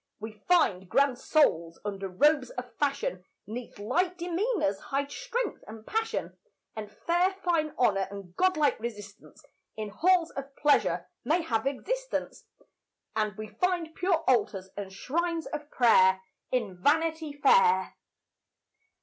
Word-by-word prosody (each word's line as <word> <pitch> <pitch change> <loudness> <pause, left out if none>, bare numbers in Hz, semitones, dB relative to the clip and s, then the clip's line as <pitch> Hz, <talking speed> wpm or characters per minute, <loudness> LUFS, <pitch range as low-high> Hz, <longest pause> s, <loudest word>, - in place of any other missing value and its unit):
We 220 +1 -6 0.2
find 195 - +3
grand 275 +2 +2
souls 170 - +2
under 195 -1 -3
robes 280 +7 +3
of 250 -1 -7
fashion, 275 -10 -1 0.2
'Neath 235 +4 -7
light 345 - 0
demeanours 350 - 0
hide 280 +4 -3
strength - - -3
and 220 +1 -10
passion; 445 +1 -2 0.4
And 210 -1 -6
fair 350 - +1
fine 320 -4 +1
honour 195 -6 +2
and 195 -3 -10
godlike 320 -6 +2
resistance 210 -3 -9 0.3
In 215 -1 -4
halls 340 - +2
of 275 0 -7
pleasure 295 -1 +2 0.2
may 335 +2 +1
have 230 -4 -1
existence; - - -3 0.7
And 215 -2 -1
we 215 0 -6
find 335 - -1
pure 350 -2 +1
altars 205 -6 +1
and 200 -2 -6
shrines 330 - -2
of 300 -1 -6
prayer 190 -8 +5 0.3
In 205 -8 -2
Vanity 320 - +1
Fair. 455 +10 +4
275 Hz, 130 wpm, -28 LUFS, 210-335 Hz, 0.7 s, prayer